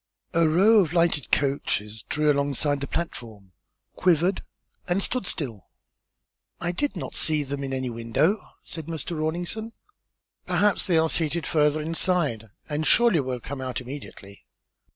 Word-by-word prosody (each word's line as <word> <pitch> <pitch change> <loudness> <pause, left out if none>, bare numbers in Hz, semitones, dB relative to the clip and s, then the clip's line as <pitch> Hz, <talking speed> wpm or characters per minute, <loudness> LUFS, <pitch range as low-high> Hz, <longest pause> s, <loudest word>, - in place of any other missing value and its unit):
A 165 -1 +4
row 205 +7 +6
of 170 -4 +1
lighted 170 -6 +2
coaches 110 -7 0
drew 150 0 +3
alongside 140 0 0
the 140 - -3
platform, 110 - -5 0.4
quivered, 180 +1 +2 0.5
and 180 +1 +1
stood 215 0 -1
still. 120 - -4 0.9
"I 175 - -1
did 255 +4 -1
not 135 -6 -5
see 155 -2 +1
them 140 0 -4
in 135 - -4
any 130 -2 -2
window," 130 - +1 0.2
said 160 -2 -7
Mr. 165 +1 -4
Rawlinson. 175 +8 -3 0.7
"Perhaps 205 -1 +2
they 175 -3 +3
are 160 0 +4
seated 160 -1 -1
further 150 0 +2
inside 160 - 0 0.2
and 155 +1 -1
surely 235 -8 +5
will 130 -2 -2
come 135 +3 -6
out 130 -2 -3
immediately." 125 -6 -10
155 Hz, 145 wpm, -25 LUFS, 135-175 Hz, 0.9 s, row